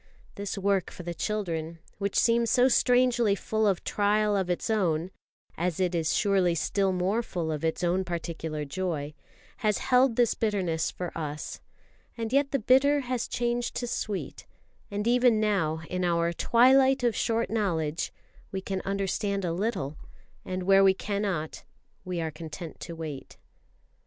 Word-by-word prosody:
This 200 -1 -5
work 195 -1 +1
for 180 - -10
the 175 0 -4
children, 170 -5 -3 0.2
which 200 -1 -2
seems 230 0 +3
so 250 +1 +5
strangely 245 -4 +3
full 220 +2 0
of 195 -3 +1
trial 210 0 +1
of 190 -2 0
its 175 - -1
own 180 -6 0 0.4
(as 175 0 -2
it 180 -1 +1
is 165 -3 0
surely 190 -4 +2
still 195 +4 +1
more 185 +5 0
full 170 -8 -3
of 150 -1 -4
its 160 +2 -1
own 180 +2 +1
particular 165 -3 -4
joy), 155 -2 -3 0.4
has 215 -4 +1
held 255 -2 +3
this 240 -2 +3
bitterness 185 -7 0
for 180 -2 -6
us, 150 -2 -5 0.6
and 225 +1 -3
yet 280 0 +3
the 275 - +1
bitter 270 +4 +4
has 250 -2 -2
changed 240 0 -1
to 245 - -2
sweet; 215 -5 -4 0.4
and 205 +1 -3
even 240 -1 +4
now 175 -7 +1
in 180 0 -2
our 170 -1 +1
"twilight 260 +6 +4
of 235 -2 +2
short 230 -1 0
knowledge" 170 -8 -1 0.4
we 190 - -2
can 190 0 -3
understand 200 0 -1
a 170 - -1
little, 180 - -2 0.5
and 185 0 -4
where 195 +1 +5
we 190 -1 +5
cannot 195 -6 -3 0.4
we 180 -1 -3
are 160 -1 -2
content 160 +1 -8
to 170 - -7
wait. 155 -4 -7
195 Hz, 160 wpm, -28 LUFS, 170-225 Hz, 0.6 s, so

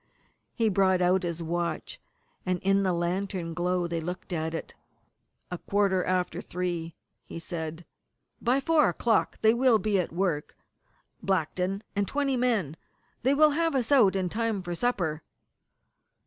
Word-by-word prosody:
He 230 -2 +2
brought 190 -2 +3
out 180 +1 +3
his 170 -2 -3
watch, 170 +1 -3 0.4
and 185 -1 0
in 195 +1 +3
the 190 -2 +1
lantern 175 0 -2
glow 180 +1 0
they 170 -1 -2
looked 180 +2 -6
at 160 0 -2
it. - - -6 0.8
"A 180 - -4
quarter 195 -2 +1
after 185 -1 -1
three," 175 -2 -4 0.3
he - - -9
said. 165 -1 -5 0.6
"By 255 +3 +2
four 310 -1 +4
o'clock 230 -2 +1
they 220 0 +5
will 245 -1 +4
be 205 -1 +1
at 180 - -2
work 170 -4 -2 0.6
Blackton 190 +2 -1
and 200 -1 0
twenty 280 -2 0
men. 220 - 0 0.4
They 265 +3 +3
will 305 +1 +6
have 330 0 +1
us 255 0 0
out 225 -9 +5
in 190 -1 0
time 220 0 -1
for 175 0 -4
supper." 170 -7 -1
185 Hz, 150 wpm, -28 LUFS, 175-225 Hz, 0.8 s, will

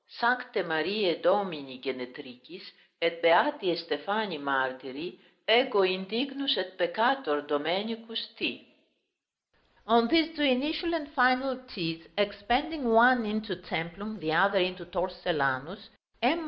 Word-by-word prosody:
Sancte 250 -2 0
Marie 170 +2 0
Domini 160 -9 0
Genetricis 130 +5 -9 0.4
et 170 0 0
beati 200 - +4
Estefani 170 +4 -2
martiri 135 +4 -3 0.3
ego 230 -2 +5
indignus 235 +10 0
et 185 0 -4
peccator 195 - +1
Domenicus 215 +10 -3
T." - - -3 1.2
On 230 +1 +5
these 325 +2 +2
two 295 - -4
initial 300 +6 +1
and 310 -3 -4
final 255 -1 +3
T's, 165 -7 -5
expanding 240 +9 0
one 235 +1 +6
into 215 -2 -3
Templum, 180 +4 -5
the 155 0 -3
other 195 +4 +4
into 185 -1 -1
Torcellanus, 175 0 -2 0.3
M. 265 +8 +3
195 Hz, 110 wpm, -28 LUFS, 165-240 Hz, 1.2 s, one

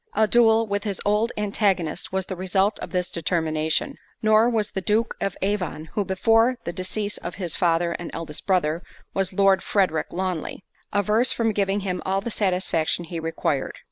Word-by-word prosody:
A 220 - +4
duel 225 0 +5
with 200 -1 -2
his 200 -4 -3
old 210 +3 +2
antagonist 200 -5 0
was 190 -1 -1
the 190 - -5
result 190 +3 +1
of - - -6
this 180 0 -1
determination; 160 - -1 0.3
nor 215 +2 +5
was 220 -3 0
the 190 - -3
Duke 215 +4 +1
of 195 - -2
Avon 180 -6 -2
(who 205 - +1
before 225 +6 +3
the 170 - -4
decease 205 +3 -3
of 175 - -6
his 175 -4 -3
father 170 -1 +2
and 170 0 -5
eldest 160 -2 -6
brother, 170 -4 +2 0.3
was 195 -1 0
Lord 195 0 +4
Frederick 185 -6 +1
Lawnly) 185 0 -3 0.3
averse 210 +5 +2
from 225 -1 +1
giving 200 0 0
him 185 -2 -2
all 190 +1 0
the 230 +4 -4
satisfaction 180 -5 0
he 170 0 -5
required. 165 0 -2
190 Hz, 175 wpm, -24 LUFS, 175-210 Hz, 0.3 s, duel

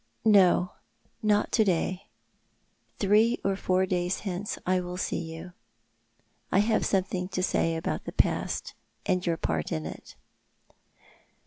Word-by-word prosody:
" - - -34
No; 185 -4 +5 0.5
not 210 -1 +2
to 220 - +4
day. 185 -1 -1 0.9
Three 215 +4 +3
or 195 0 +1
four 185 -1 +1
days 180 0 -1
hence 195 0 -4
I 185 0 +2
will 180 0 -5
see 185 - -2
you. 165 +2 -9 1.0
I - - +3
have 215 +2 +2
something 185 -1 0
to 185 -1 -2
say 165 -2 +1
about 160 - -3
the - - -5
past, - - 0 0.3
and 180 -1 +1
your 170 -2 0
part 80 - -2
in 80 0 -2
it." - - -9
185 Hz, 140 wpm, -28 LUFS, 175-200 Hz, 1.0 s, No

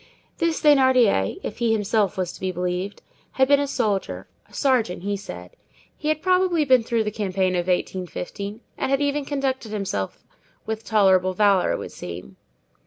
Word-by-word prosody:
This 335 -1 +1
Thénardier, 260 - +4
if 210 - -6
he 235 -2 +2
himself 210 -2 +1
was 185 -2 -1
to - - -12
be 185 0 -2
believed, 180 +2 -3 0.3
had 265 0 +3
been 285 0 +5
a 285 - 0
soldier—a 210 -7 -3
sergeant, 235 -11 0
he 205 +1 -1
said. 90 - -9 0.4
He 300 - -6
had 310 0 0
probably 365 -4 +3
been 255 -3 +5
through 230 0 0
the 210 - -2
campaign 190 -3 0
of 175 0 -1
1815, 185 +3 -3 0.2
and - - -1
had 275 0 +2
even 285 0 0
conducted 270 -5 -2
himself 190 - -3 0.4
with 220 0 -4
tolerable 190 -4 +3
valor, 200 -2 +3
it - - -1
would - - -7
seem. 90 +2 -9
210 Hz, 170 wpm, -23 LUFS, 185-265 Hz, 0.4 s, been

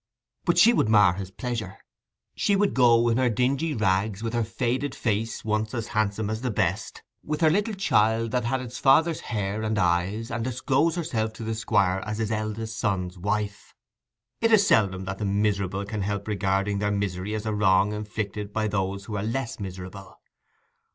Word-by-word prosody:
But - - +2
she 235 +2 +7
would 110 - +2
mar 105 -4 +6
his 95 0 -6
pleasure: 115 -2 -5 0.6
she 200 - +1
would 200 0 +2
go 120 -2 +5
in 115 0 +2
her 130 -1 +3
dingy 135 +7 0
rags, 100 0 0
with 115 0 -3
her 120 -1 +1
faded 125 +5 -2
face, 110 0 -2
once 110 +1 -1
as 115 -2 -4
handsome 110 -2 0
as 110 +1 -3
the 125 - -1
best, 100 -2 -2 0.2
with 150 +1 -3
her 160 -1 +5
little 210 +4 0
child 110 - +2
that 125 -1 0
had 130 +2 0
its 125 -1 -7
father's 160 +5 +4
hair 105 -2 -3
and 110 0 -1
eyes, 95 +4 0
and 115 0 -2
disclose 130 +6 +1
herself 115 -11 -2
to 110 - -8
the 110 0 -2
Squire 100 -4 +1
as 105 0 -4
his 110 -1 -2
eldest 110 0 -3
son's 95 -4 -1
wife. 105 +1 -3 0.6
It 230 0 +2
is 210 -2 +6
seldom 95 - +2
that 95 +1 -5
the 105 - -2
miserable 100 -1 0
can 105 0 -4
help 100 +1 -3
regarding 100 -1 0
their 105 0 0
misery 100 0 -2
as 110 - -4
a 110 - -1
wrong 105 0 +3
inflicted 105 -1 -4
by 110 +1 -1
those 100 -1 -2
who 105 - -5
are - - -2
less 120 +2 -3
miserable. 95 0 -8
110 Hz, 190 wpm, -26 LUFS, 100-120 Hz, 0.6 s, she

